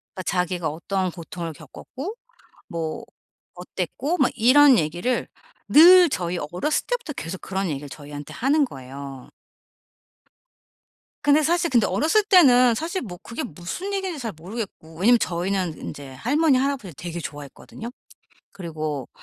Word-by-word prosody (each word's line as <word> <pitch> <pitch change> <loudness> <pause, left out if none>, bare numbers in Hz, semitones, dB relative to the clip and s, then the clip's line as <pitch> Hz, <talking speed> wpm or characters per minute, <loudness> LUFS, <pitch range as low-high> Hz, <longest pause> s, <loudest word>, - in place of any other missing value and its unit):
아 185 - -5
자기가 180 -2 -1
어떠한 185 +4 -2
고통을 170 -1 -7
겪었고 305 - -8 0.5
뭐 165 +7 -4 0.5
어땠고 190 - -3
뭐 265 - +3
이런 260 +2 +6
얘기를 175 +11 -1 0.4
늘 350 +3 +8
저희 175 -6 -2
어렸을 245 - -1
때부터 - - -3
계속 170 -1 -6
그런 190 -1 -2
얘기를 145 0 -4
저희한테 145 0 -9
하는 285 +3 +2
거예요. 135 - -9 1.9
근데 295 +1 +4
사실 340 +1 +1
근데 235 -5 +3
어렸을 315 - +2
때는 255 - +6
사실 340 - -3
뭐 180 -7 -8
그게 230 - -6
무슨 185 - -6
얘긴지 380 -5 -2
잘 230 -4 -4
모르겠고 180 -2 -8
왜냐하면 230 +6 +5
저희는 180 -1 -1
인제 140 -2 -8
할머니, 280 - +2
할아버지를 260 - -2
되게 175 0 -5
좋아했거든요. 145 - -8 0.6
그리고 155 -7 -5
195 Hz, 320 characters per minute, -23 LUFS, -, 1.9 s, 늘